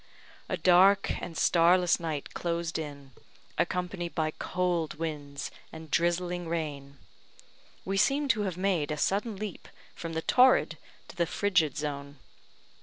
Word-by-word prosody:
A 185 Hz, -, -1 dB
dark 185 Hz, +3 st, +5 dB
and 165 Hz, -2 st, -6 dB
starless 175 Hz, +1 st, +4 dB
night 160 Hz, -4 st, -4 dB
closed 170 Hz, -1 st, -2 dB
in, 140 Hz, -3 st, -8 dB, 0.5 s
accompanied 180 Hz, -1 st, -2 dB
by 155 Hz, -1 st, 0 dB
cold 175 Hz, -2 st, -1 dB
winds 150 Hz, -3 st, -5 dB, 0.2 s
and 160 Hz, -1 st, -10 dB
drizzling 175 Hz, 0 st, 0 dB
rain. 145 Hz, -4 st, -4 dB, 0.9 s
We 195 Hz, +1 st, -1 dB
seemed 275 Hz, +6 st, +3 dB
to 215 Hz, -, -1 dB
have 190 Hz, -4 st, -2 dB
made 185 Hz, -6 st, 0 dB
a 150 Hz, -, -2 dB
sudden 205 Hz, +7 st, 0 dB
leap 205 Hz, -1 st, -6 dB, 0.3 s
from 165 Hz, -1 st, -6 dB
the 160 Hz, 0 st, -2 dB
torrid 255 Hz, 0 st, +4 dB, 0.3 s
to -, -, -11 dB
the 170 Hz, -2 st, +1 dB
frigid 180 Hz, -7 st, +1 dB
zone. 145 Hz, -1 st, -5 dB
170 Hz, 135 wpm, -29 LUFS, 155-185 Hz, 0.9 s, dark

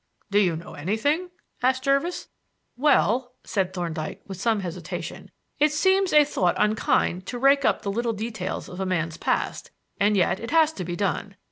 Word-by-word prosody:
"Do 205 Hz, -, +4 dB
you 180 Hz, -5 st, +2 dB
know 165 Hz, -, -9 dB
anything?" 255 Hz, -, -1 dB, 0.3 s
asked 260 Hz, +1 st, +2 dB
Jervis. 275 Hz, +6 st, 0 dB, 0.5 s
"Well," 255 Hz, -2 st, +2 dB
Thorndyke 175 Hz, -5 st, -3 dB
said, -, -, -32 dB
with 190 Hz, -2 st, -7 dB
some 225 Hz, -2 st, +1 dB
hesitation, 175 Hz, -3 st, -6 dB, 0.3 s
"it 300 Hz, +1 st, +4 dB
seems 380 Hz, +4 st, +2 dB
a 300 Hz, 0 st, +7 dB
thought 180 Hz, -11 st, +1 dB
unkind 210 Hz, -3 st, +1 dB
to 245 Hz, -, -4 dB
rake 275 Hz, +2 st, +4 dB
up 210 Hz, -, +2 dB
the 200 Hz, -, -1 dB
little 235 Hz, +3 st, -1 dB
details 215 Hz, -3 st, -4 dB
of 180 Hz, -, -9 dB
a 190 Hz, -, -1 dB
man's 165 Hz, -3 st, -1 dB
past, -, -, -1 dB, 0.3 s
and 205 Hz, +1 st, +3 dB
yet 185 Hz, +1 st, +2 dB
it 230 Hz, -, -6 dB
has 320 Hz, 0 st, +4 dB
to 185 Hz, -, -5 dB
be 175 Hz, 0 st, -4 dB
done. 195 Hz, +1 st, -2 dB
215 Hz, 175 wpm, -25 LUFS, 185-275 Hz, 0.5 s, a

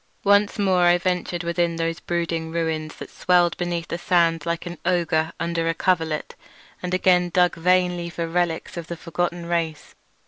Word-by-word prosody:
Once 205 Hz, 0 st, +3 dB
more 190 Hz, -3 st, +2 dB
I 175 Hz, 0 st, +5 dB
ventured 180 Hz, -1 st, -2 dB
within 170 Hz, 0 st, 0 dB
those 165 Hz, 0 st, -2 dB
brooding 170 Hz, -2 st, -2 dB
ruins 160 Hz, -2 st, -2 dB
that -, -, -10 dB
swelled 175 Hz, -1 st, +2 dB
beneath 175 Hz, -1 st, -2 dB
the 170 Hz, -, -3 dB
sand 170 Hz, -2 st, +2 dB
like 170 Hz, +1 st, -2 dB
an 175 Hz, -1 st, -7 dB
ogre 165 Hz, -3 st, +1 dB
under 170 Hz, 0 st, -1 dB
a 165 Hz, -, 0 dB
coverlet, 160 Hz, -4 st, 0 dB, 0.5 s
and 180 Hz, -, -4 dB
again 180 Hz, -1 st, +3 dB
dug 180 Hz, 0 st, +3 dB
vainly 180 Hz, 0 st, +1 dB
for 170 Hz, -1 st, -4 dB
relics 170 Hz, 0 st, -1 dB
of 170 Hz, -1 st, -5 dB
the 170 Hz, -, -6 dB
forgotten 175 Hz, +1 st, -3 dB
race. 165 Hz, -3 st, -2 dB
170 Hz, 170 wpm, -23 LUFS, 165-180 Hz, 0.5 s, I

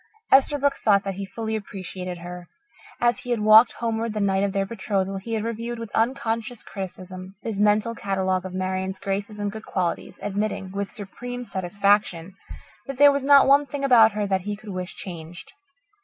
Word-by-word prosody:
Esterbrook 280 Hz, +1 st, +4 dB
thought 200 Hz, -2 st, +3 dB
that 195 Hz, -, -3 dB
he 195 Hz, +1 st, -6 dB
fully 220 Hz, +1 st, -4 dB
appreciated 185 Hz, -3 st, -6 dB
her. 175 Hz, 0 st, -9 dB, 0.5 s
As 240 Hz, 0 st, +2 dB
he 245 Hz, -, -9 dB
had 235 Hz, -3 st, 0 dB
walked 215 Hz, +2 st, +7 dB
homeward 230 Hz, -1 st, -2 dB
the -, -, -1 dB
night 195 Hz, -1 st, +1 dB
of 200 Hz, -, 0 dB
their 195 Hz, 0 st, 0 dB
betrothal, 195 Hz, -2 st, -2 dB
he 225 Hz, +4 st, -6 dB
had 215 Hz, -, -2 dB
reviewed 230 Hz, +1 st, -4 dB
with 230 Hz, -2 st, -7 dB
unconscious 230 Hz, -1 st, -1 dB
criticism 185 Hz, -1 st, -8 dB
his 215 Hz, -3 st, -3 dB
mental 210 Hz, +2 st, +3 dB
catalogue 190 Hz, -4 st, -1 dB
of 185 Hz, -, -6 dB
Marian's 190 Hz, 0 st, -2 dB
graces 200 Hz, +2 st, -3 dB
and 205 Hz, -1 st, -2 dB
good 220 Hz, +1 st, -8 dB
qualities, 180 Hz, -3 st, -2 dB
admitting, 205 Hz, -1 st, -2 dB
with 200 Hz, 0 st, -3 dB
supreme 245 Hz, +4 st, -7 dB
satisfaction, 195 Hz, -3 st, 0 dB, 0.5 s
that 275 Hz, -2 st, -5 dB
there 285 Hz, +1 st, +8 dB
was 280 Hz, -1 st, -1 dB
not 280 Hz, 0 st, +7 dB
one 280 Hz, +1 st, +5 dB
thing 275 Hz, +1 st, -5 dB
about 230 Hz, -5 st, +6 dB
her 210 Hz, 0 st, -1 dB
that 190 Hz, -1 st, 0 dB
he 205 Hz, +3 st, -4 dB
could 215 Hz, +1 st, -12 dB
wish 185 Hz, -1 st, -5 dB
changed. 170 Hz, -1 st, -8 dB
205 Hz, 185 wpm, -24 LUFS, 190-230 Hz, 0.5 s, there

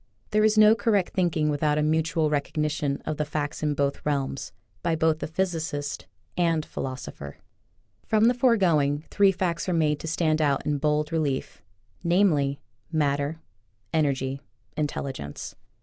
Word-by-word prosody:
There 215 Hz, 0 st, +3 dB
is 215 Hz, 0 st, +3 dB
no 215 Hz, 0 st, +8 dB
correct 210 Hz, -5 st, +1 dB
thinking 170 Hz, -4 st, +1 dB
without 150 Hz, 0 st, +1 dB
a 150 Hz, -, +2 dB
mutual 155 Hz, 0 st, +1 dB
recog 145 Hz, -1 st, -1 dB
nition 150 Hz, -2 st, -1 dB
of 155 Hz, -, -3 dB
the 150 Hz, -, 0 dB
facts 150 Hz, 0 st, -3 dB
in 150 Hz, -1 st, 0 dB
both 140 Hz, 0 st, -1 dB
realms, 140 Hz, -2 st, -2 dB, 0.3 s
by 170 Hz, -2 st, +1 dB
both 160 Hz, -1 st, +2 dB
the -, -, -3 dB
physicist 160 Hz, -4 st, -3 dB, 0.3 s
and 165 Hz, -3 st, +1 dB
philosopher. 125 Hz, -, -6 dB, 0.7 s
From 215 Hz, 0 st, +3 dB
the 240 Hz, -, +5 dB
foregoing, 170 Hz, -, +2 dB
three 200 Hz, -1 st, +5 dB
facts 180 Hz, -1 st, -2 dB
are -, -, +1 dB
made 150 Hz, -3 st, +2 dB
to -, -, -6 dB
stand 160 Hz, -1 st, +1 dB
out 140 Hz, -2 st, +1 dB
in 145 Hz, -1 st, 0 dB
bold 150 Hz, +1 st, +1 dB
relief, 150 Hz, -5 st, -2 dB, 0.4 s
namely: 165 Hz, -6 st, +2 dB, 0.3 s
Matter, 145 Hz, 0 st, 0 dB, 0.5 s
Energy, 135 Hz, -3 st, 0 dB, 0.3 s
Intelligence. 135 Hz, -, -4 dB
155 Hz, 150 wpm, -26 LUFS, 145-170 Hz, 0.7 s, no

